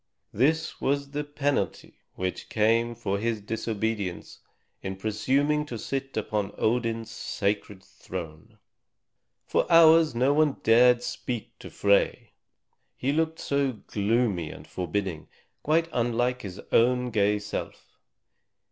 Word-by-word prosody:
This 160 +8 +1
was 140 0 0
the 150 +1 -2
penalty 145 - -2 0.2
which 90 0 -4
came 115 +2 +2
for 100 -4 -2
his 115 0 -1
disobedience 110 -2 -3 0.4
in 95 0 -4
presuming 130 +9 +1
to 120 - -5
sit 135 +4 -4
upon 105 -2 -2
Odin's 115 -1 0
sacred 100 -1 -3
throne. 90 +5 -9 0.9
For - - 0
hours 165 -3 +7
no 130 +4 +3
one 150 -1 +3
dared 120 +2 +5
speak 120 -3 -5
to - - -9
Frey, 100 0 +1 0.6
he 135 - 0
looked 160 +2 0
so 140 -2 0
gloomy 105 -5 -1
and - - -10
forbidding, 90 -2 -3 0.3
quite 160 +2 +2
unlike 120 +1 0
his 95 -3 -8
own 125 +1 +3
gay 105 -1 +2
self. 105 +1 -7
115 Hz, 120 wpm, -27 LUFS, 105-135 Hz, 0.9 s, hours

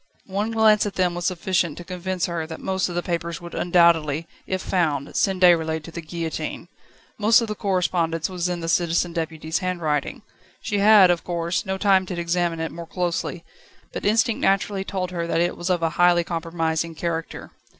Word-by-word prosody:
One 205 +3 -2
glance 220 -2 +4
at 200 - -6
them 180 -2 +1
was 175 0 -2
sufficient 180 -3 0
to 175 - -7
convince 180 +1 -3
her 170 -2 -3
that 160 0 -7
most 190 -1 -1
of 175 - -6
the 175 - -1
papers 170 -1 -3
would 170 0 -10
undoubtedly, 165 -3 +3 0.2
if 185 - -1
found, 150 -6 -1
send 190 -1 +1
Déroulède 160 -3 +4
to 165 - -10
the 170 - -6
guillotine. 160 0 -5 0.5
Most 220 +3 +5
of 230 - -2
the 215 - -2
correspondence 175 -5 0
was 180 -1 -2
in 175 -1 -3
the 165 - -4
Citizen 170 0 +1
Deputy's 160 -1 -3
handwriting. 170 -5 -2 0.4
She 205 -2 -2
had, 200 -3 +7
of 175 -1 -1
course, 170 +2 -2
no 190 0 -1
time 190 -2 +3
to 180 -2 -4
examine 170 -1 0
it 160 0 -3
more 170 -1 -8
closely, 175 -1 -3 0.5
but - - -5
instinct 225 +2 +2
naturally 195 0 +1
told 185 -2 -3
her 170 -2 -3
that 165 - 0
it 175 +1 +1
was 175 +2 -4
of 175 -2 +1
a 165 - +1
highly 175 -1 +5
compromising 165 -1 -2
character. 165 0 -4
175 Hz, 190 wpm, -23 LUFS, 165-185 Hz, 0.5 s, had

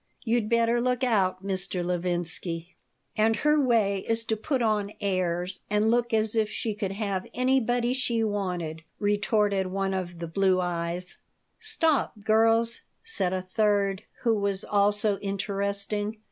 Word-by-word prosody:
You'd 230 -2 0
better 235 0 +2
look 250 +1 0
out, 195 -6 +1
Mr. 185 -2 -2
Levinsky." 175 -1 0 0.4
"And 220 +1 +3
her 300 +6 +3
way 220 -6 +2
is 225 0 +1
to 220 - 0
put 250 +3 -1
on 210 -2 0
airs 185 -1 -1
and 210 +2 +2
look 240 0 +1
as 220 0 +1
if 220 -1 +2
she 220 0 -3
could 200 -2 -3
have 200 -2 -3
anybody 245 -1 +2
she 240 -3 0
wanted," 180 -6 -2 0.2
retorted 205 -1 +1
the - - -6
one 195 0 -1
of 180 -2 -4
the 170 0 -5
blue 190 +2 +2
eyes 175 0 -1 0.4
"Stop, 325 - 0
girls," 225 +2 +3 0.2
said 320 - -1
a 185 -1 -2
third, 200 0 +1 0.2
who 230 -2 +3
was 200 -2 -1
also 205 0 +2
interesting. 200 +1 -2
205 Hz, 145 wpm, -27 LUFS, 190-225 Hz, 0.4 s, And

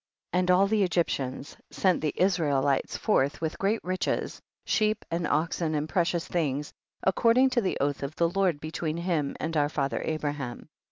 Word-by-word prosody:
59. 180 - +2
And 180 - -1
all 185 +2 +5
the 210 +1 +1
Egyptians 145 -7 -1
sent 185 -3 +1
the 150 -1 0
Israelites 145 -7 +1
forth, 145 -10 +1
with 160 -1 -3
great 205 +3 0
riches, 185 +1 -2 0.2
sheep 215 -1 +1
and 170 0 -1
oxen 160 +1 0
and 150 +1 -1
precious 170 +1 0
things, 150 -4 -1 0.3
according 235 +7 +4
to 250 -2 +2
the 190 - -1
oath 145 0 0
of 140 +2 -4
the 170 -1 +2
Lord 185 -5 +1
between 155 +1 -3
him 170 -5 -1
and 165 +1 -3
our 145 -1 +2
father 140 -3 -1
Abra 155 -2 -1
ham. 135 -5 -7
165 Hz, 175 wpm, -28 LUFS, 145-185 Hz, 0.3 s, all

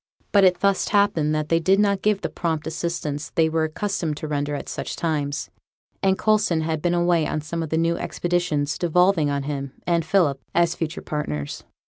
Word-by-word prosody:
But 200 -1 +5
it 180 -1 +4
thus 200 -1 +2
happened 170 -7 +2
that 155 0 -2
they 165 - +3
did 190 +4 +3
not 200 -2 +2
give 210 -1 +1
the - - -2
prompt 160 -3 -2
assistance 160 -3 -3
they 160 -1 +4
were 160 0 +1
accustomed 160 -2 -2
to 155 - -5
render 145 0 -1
at - - -6
such - - -4
times; 145 -4 -2 0.5
and 190 0 +2
Coulson 210 -7 +2
had 160 -1 -2
been 175 +1 +1
away 175 -2 +2
on 155 - -2
some 165 +3 -4
of 160 - -4
the 160 - 0
new 165 +1 +1
expeditions 170 -5 -1
devolving 175 -2 +3
on 140 -1 -1
him 140 -1 -4
and 170 -1 +2
Philip 155 -5 +2
as 170 0 +3
future 165 -1 -4
partners. 75 - -4
165 Hz, 195 wpm, -23 LUFS, 150-180 Hz, 0.5 s, But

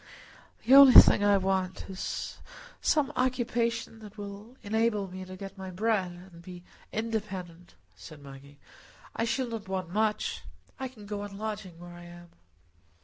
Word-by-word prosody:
"The 255 - +4
only 275 -2 +11
thing 205 - +5
I 205 -1 +5
want 190 -1 -2
is 190 -1 -5 0.4
some 295 -2 +1
occupation 235 -3 -1
that 215 -1 -13
will 205 +4 -9
enable 215 -1 0
me 185 0 -8
to 185 0 -10
get 195 0 -9
my 190 0 -6
bread 190 -1 -1 0.2
and 170 - -13
be 175 0 -11 0.3
independent," 190 - -5 0.2
said 125 +11 -12
Maggie. 140 0 -13 0.6
"I 230 - 0
shall 250 +1 -1
not 225 -4 -6
want 185 -2 -4
much. 215 0 0 0.4
I 265 - -3
can 230 -5 -14
go 205 0 -5
on 205 -1 -8
lodging 210 -5 -6
where 175 0 -11
I 175 0 -12
am." 175 0 -13
200 Hz, 155 wpm, -29 LUFS, 180-225 Hz, 0.6 s, only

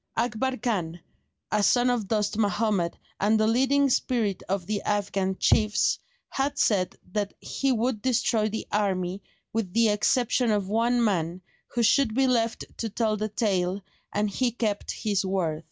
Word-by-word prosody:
Akbar 245 +3 0
Khan, 180 -8 -2 0.5
a 210 - +2
son 245 +4 +3
of 230 -5 -1
Dost 210 0 0
Mahomed 205 -4 0 0.2
and 215 +2 +3
the 215 - +3
leading 270 +5 +3
spirit 235 -6 0
of 195 -2 -1
the 205 +1 -2
Afghan 195 -2 -1
chiefs, 215 0 +2 0.3
had 280 +1 -1
said 190 -8 +1 0.2
that 205 0 -2
he 275 -1 -1
would 235 -2 0
destroy 225 -3 +1
the 220 +1 -4
army 190 -2 -1 0.3
with 215 -5 -2
the 230 -1 +4
exception 240 +3 +2
of 205 -3 +1
one 235 +3 +2
man 180 -4 -1 0.3
who 240 - +2
should 230 -1 +3
be 270 +1 +3
left 230 -3 0
to 225 - -2
tell 215 0 0
the 215 +1 -2
tale, 195 -3 0 0.3
and 205 0 0
he 250 +5 +1
kept 220 -3 -2
his 205 -3 -1
word. 185 -5 -1
215 Hz, 160 wpm, -26 LUFS, 200-235 Hz, 0.5 s, the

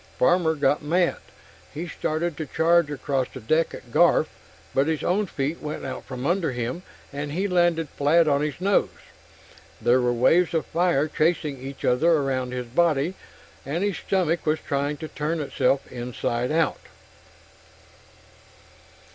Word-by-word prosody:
Farmer 165 +2 +3
got 145 0 +2
mad. 170 +4 +1 0.5
He 165 +4 -5
started 165 0 -2
to 155 - -4
charge 170 0 +3
across 135 -2 -1
the - - -8
deck 155 +9 +1
at - - -13
Garf, - - +4 0.5
but 135 +2 +2
his 160 -2 -1
own 200 +3 +1
feet 145 +1 -3
went 150 0 -5
out - - -6
from 130 -1 -6
under 170 -4 +1
him 125 +7 -3 0.3
and 145 +1 -4
he 190 +5 0
landed 175 -3 +2
flat 155 +4 +3
on 140 -1 +2
his 150 -1 -3
nose. 195 +2 +2 0.9
There 125 +2 +3
were 125 0 +2
waves 165 +9 +3
of 160 - 0
fire 170 -4 +1
chasing 155 -3 0
each 135 +1 -7
other 140 +8 +3
around 135 -4 0
his 125 -1 -4
body, 155 +5 +1 0.5
and 155 +7 -2
his 205 -2 0
stomach 175 -3 0
was 155 0 +1
trying 145 0 -2
to 160 - -6
turn 155 +2 -3
itself 140 -2 0
inside 120 0 -2
out. 165 +1 +1
155 Hz, 155 wpm, -24 LUFS, 135-170 Hz, 0.9 s, Garf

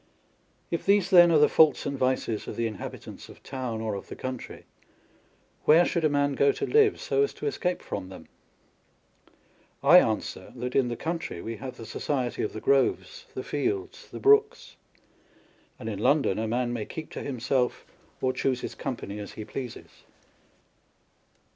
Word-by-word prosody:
1 - - -37 0.7
If - - -20
these, 200 -1 +3
then, 175 -2 +8
are 160 - +5
the 150 0 +6
faults 155 -4 +4
and 140 - -2
vices 130 -4 -1
of - - -5
the 115 - -1
inhabitants 110 -3 -7
of - - -15
town 125 -4 -4
or 110 -1 -2
of 100 - -6
the - - -8
country, 130 -2 -7 1.0
where 165 +3 +6
should 170 -1 -1
a 155 - +4
man 145 0 +1
go 140 +1 +4
to - - -3
live, 430 -1 +3
so - - 0
as 420 - 0
to - - -7
escape 180 - -1
from 95 -2 -5
them? 95 - -11 1.6
I 165 +6 +9
answer, 110 -9 -2
that 125 0 -5
in 135 -2 +3
the 120 - -3
country 165 - -4
we 115 +5 -5
have 130 +2 -8
the 115 - -9
society 130 0 -2
of - - -2
the 110 - -5
groves, 140 - +1
the - - -4
fields, 380 +1 -3
the - - -8
brooks, 425 +3 +3 1.0
and 115 - -8
in 105 -3 -4
London 135 -4 +2
a 110 - -1
man 120 +1 -1
may 110 -3 -3
keep 160 -1 -7
to - - -6
himself, 125 -1 -1 0.4
or 130 0 +1
choose 130 -1 -1
his - - -5
company 105 -5 -5
as 105 - -8
he 110 - -7
pleases. 125 0 -8
130 Hz, 180 wpm, -27 LUFS, 115-170 Hz, 1.6 s, I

